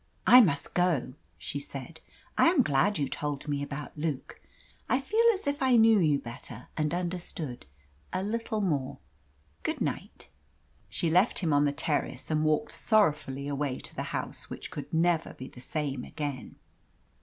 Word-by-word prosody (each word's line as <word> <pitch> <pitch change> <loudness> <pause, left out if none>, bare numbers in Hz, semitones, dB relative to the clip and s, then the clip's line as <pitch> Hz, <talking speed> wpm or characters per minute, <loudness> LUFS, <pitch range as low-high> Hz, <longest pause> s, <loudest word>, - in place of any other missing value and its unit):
"I 250 - +10
must 150 -10 +1
go," 170 -8 +1 0.2
she 85 - -4
said. 140 +3 -8 0.4
"I - - +5
am 330 -6 +5
glad 155 +7 +2
you 140 -2 0
told 145 +1 -4
me 145 -1 -1
about 145 +1 -6
Luke. 150 -3 -4 0.5
I 260 - +3
feel 430 - +1
as 380 - -8
if 285 0 -1
I 260 -2 +4
knew 225 -2 +6
you 150 -5 +3
better 120 -1 -9
and 155 -1 0
understood 175 - -4 0.4
a 185 +1 -1
little 220 +1 -2
more. 145 -9 -1 0.6
Good - - -2
night." - - -4 0.6
She 160 - -1
left 180 +7 +4
him 165 -5 +1
on 145 0 +4
the 145 - +2
terrace, 145 +2 -2
and 155 0 +2
walked 155 +8 +1
sorrowfully 150 - +1
away 140 -2 -1
to - - -7
the - - -2
house - - -4
which - - -7
could 145 -2 -7
never 165 0 +1
be 130 - -8
the 125 - -13
same 140 -2 -3
again. 145 -5 -5
155 Hz, 165 wpm, -29 LUFS, 140-185 Hz, 0.6 s, I